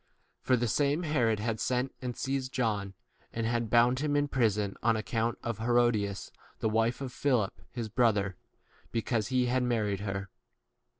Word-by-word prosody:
For 130 - +3
the 120 0 0
same 145 - +1
Herod 120 -9 +1
had 110 0 -2
sent 125 +1 0
and 125 -2 -4
seized 135 -1 -2
John, 105 -6 -1 0.4
and 115 0 -2
had 115 -1 0
bound 120 +3 +4
him 145 0 0
in 145 - +3
i - - -2
prison, 105 -6 +1
on 115 -1 +3
account 115 +2 -1
of 115 -2 -3
Herodias, 115 -4 +1 0.3
the 110 - 0
wife 115 +3 +1
of 130 -2 -5
Philip 125 -8 0
his 120 -2 -4
brother, 105 -4 +2 0.6
because 115 -1 0
he 130 0 +2
18 125 - 0
had 130 - +2
married 110 -5 0
her. 100 -1 -4
115 Hz, 175 wpm, -30 LUFS, 110-125 Hz, 0.6 s, bound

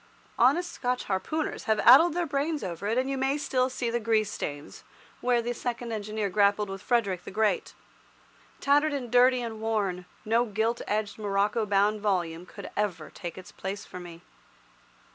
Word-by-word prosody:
Honest 350 +1 +3
Scotch 250 -1 -2
harpooners 300 +11 -2
have 220 -1 +2
addled 305 +7 +7
their 350 -1 0
brains 290 0 -1
over 185 +1 -4
it, 225 +3 0
and 260 +1 +1
you 270 -1 -2
may 270 +2 +1
still 255 -3 0
see 245 -2 -2
the 240 - 0
grease 215 -2 +1
stains 145 -5 -6 0.4
where 240 -1 +1
the 240 +1 -2
second 240 0 -4
engineer 215 -1 -2
grappled 200 +1 +2
with 195 -1 -6
Frederick 200 -8 0
the - - -8
Great. 210 -2 0 0.8
Tattered 290 +2 +3
and 250 -5 -4
dirty 250 0 +5
and 220 -2 -6
worn, 200 -5 -1 0.2
no 230 +3 +3
gilt 225 +2 -1
edged 210 0 -2
morocco 205 +2 0
bound 205 +1 +2
volume 180 -4 -1
could - - -9
ever 185 -7 -2
take 175 -3 -7
its 185 - -10
place 195 +2 -6
for 180 - -9
me. 175 -1 -11
220 Hz, 175 wpm, -28 LUFS, 195-250 Hz, 0.8 s, addled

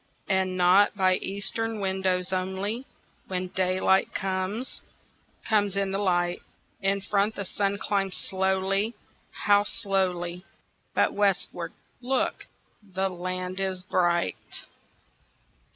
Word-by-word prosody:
And 190 -1 +1
not 185 +3 +5
by 185 -1 +4
eastern 215 +3 -2
windows 190 -1 0
only, 190 +7 -2 0.4
When 185 -1 -2
daylight 185 +1 +2
comes, 190 +6 -2 0.7
comes 205 -3 +2
in 195 -1 +1
the 195 - -1
light; 175 -3 +1 0.4
In 195 0 +1
front 205 +2 +1
the 200 - -3
sun 200 +2 0
climbs 195 -2 -1
slow, 190 +3 0 0.5
how 205 0 +6
slowly! 185 -5 -1 0.5
But - - +3
westward, 200 -2 0 0.3
look, 255 +1 0 0.3
the 195 -1 -2
land 185 +1 -4
is 190 -1 -2
bright! 175 - 0
190 Hz, 105 wpm, -27 LUFS, 185-200 Hz, 0.7 s, how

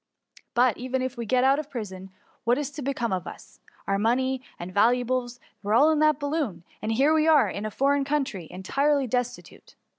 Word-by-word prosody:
But, 245 -2 +3
even 255 +1 -2
if 260 0 -3
we 235 -2 -5
get 255 +2 +2
out 270 +2 +4
of 300 -1 -6
prison, 190 -7 -7 0.3
what 240 +2 +2
is 290 -1 -3
to 290 +1 -7
become 250 -6 -2
of 180 -2 -3
us? - - -11 0.3
Our 195 0 0
money 260 +4 +1 0.2
and 175 +2 -8
vHuables 245 +3 +1 0.2
were 210 +1 0
all 295 +6 +6
in 310 - +1
the 305 0 +5
balloon; 285 - -3 0.2
and 220 - -2
here 275 +7 +3
we 315 0 +3
are, 315 -2 +5
in 210 +2 -4
a - - -3
foreign 280 +5 +1
country, 270 - -2
entirely 275 +10 0
destitute.' 245 0 -4
255 Hz, 200 wpm, -26 LUFS, 220-280 Hz, 0.3 s, all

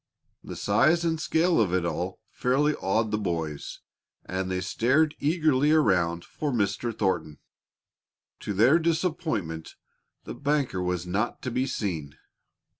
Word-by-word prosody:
The - - -7
size 170 +2 +2
and 160 -1 0
scale 165 -3 +2
of 100 -5 +1
it 90 -2 0
all 90 +2 -3
fairly 140 +4 +1
awed 110 -1 0
the 105 - 0
boys, 80 -7 -4 0.4
and 95 0 -3
they 95 0 -1
stared 135 - +2
eagerly 150 -2 +2
around 90 - +2
for 150 - -4
Mr. 110 0 0
Thornton. 90 -8 -1 1.0
To 105 - -4
their 120 - +5
disappointment 155 - -2 0.5
the - - -7
banker 140 -9 -1
was 90 -1 -2
not 100 +6 -2
to 130 - -3
be 130 +3 0
seen. 85 - -4
110 Hz, 135 wpm, -27 LUFS, 90-150 Hz, 1.0 s, their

